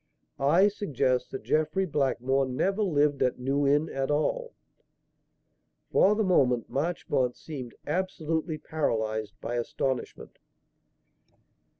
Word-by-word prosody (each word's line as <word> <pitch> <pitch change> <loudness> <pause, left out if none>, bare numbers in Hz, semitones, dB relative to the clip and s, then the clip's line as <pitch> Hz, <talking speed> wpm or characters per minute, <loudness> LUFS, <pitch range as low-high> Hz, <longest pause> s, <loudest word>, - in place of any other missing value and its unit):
"I 165 +9 +5
suggest 140 - 0
that 130 - -6
Jeffrey 155 +5 +1
Blackmore 135 -3 +1
never 195 +11 0
lived 150 -7 +2
at 125 - +2
New 135 +3 0
Inn 145 +3 +3
at 135 0 -3
all." 485 - -1 1.4
For 205 +2 +5
the 220 - +1
moment, 125 - +2
Marchmont 135 -4 0
seemed 130 -7 -8
absolutely 160 -2 -2
paralysed 110 -9 -2
by 120 +1 -3
astonishment. 130 +2 -3
145 Hz, 105 wpm, -28 LUFS, 130-170 Hz, 1.4 s, I